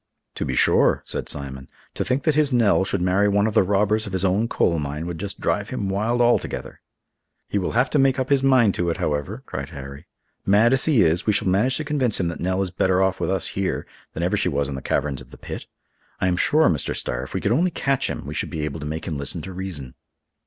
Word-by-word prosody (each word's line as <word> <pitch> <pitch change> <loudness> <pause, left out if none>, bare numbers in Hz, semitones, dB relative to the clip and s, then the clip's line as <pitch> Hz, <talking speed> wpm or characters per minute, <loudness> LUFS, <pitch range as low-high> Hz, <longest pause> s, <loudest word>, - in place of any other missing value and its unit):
"To - - -3
be - - -2
sure," - - +3
said - - -4
Simon. 65 -2 -6 0.2
"To - - -2
think 135 +2 -1
that 155 - +3
his 150 -1 +2
Nell 115 -6 +3
should 95 -1 -1
marry 95 +3 +3
one 100 +1 +2
of 110 - -1
the 110 - +5
robbers 105 +3 +1
of 100 - -7
his 95 +1 0
own 100 +5 +2
coal 85 -7 +1
mine 75 +2 -4
would 85 -2 -5
just 100 0 -5
drive 105 +1 -1
him 100 -6 -3
wild 110 +5 0
altogether." 120 0 0 0.7
"He 100 - -1
will 90 - -2
have 125 +3 +3
to 150 - +2
make 135 0 +3
up 130 +1 -2
his 140 -1 +4
mind 130 -7 +4
to 85 -1 -1
it, 85 - -1
however," 75 -2 -2
cried - - -5
Harry. 70 0 -9 0.4
"Mad 105 +5 +4
as 135 - +3
he 140 -10 +4
is, 85 +4 +1
we 105 - +4
shall 100 - 0
manage 105 +8 +2
to 155 - -3
convince 140 -7 0
him 85 -2 0
that 85 - -6
Nell 95 +2 0
is 90 - -4
better 95 0 +1
off 95 0 +1
with - - -1
us 95 -1 +1
here 95 -1 -2 0.3
than 85 - -3
ever 90 - +1
she - - +1
was 70 -3 0
in 70 - -5
the 65 - -5
caverns 70 -1 -1
of 65 - -14
the - - -13
pit. - - -8 0.5
I 95 - +1
am 90 - +2
sure, 155 - +3
Mr. 75 -6 0
Starr, - - -3
if 65 - -8
we - - -1
could 100 - 0
only 170 +10 +3
catch 135 -5 0
him, - - -5
we - - -5
should - - -2
be 75 -1 -3
able 75 +1 -5
to 75 - -5
make 80 +2 -5
him 75 -4 -3
listen 70 - -2
to 95 - -7
reason." 85 -9 -6
95 Hz, 260 wpm, -23 LUFS, 80-120 Hz, 0.7 s, the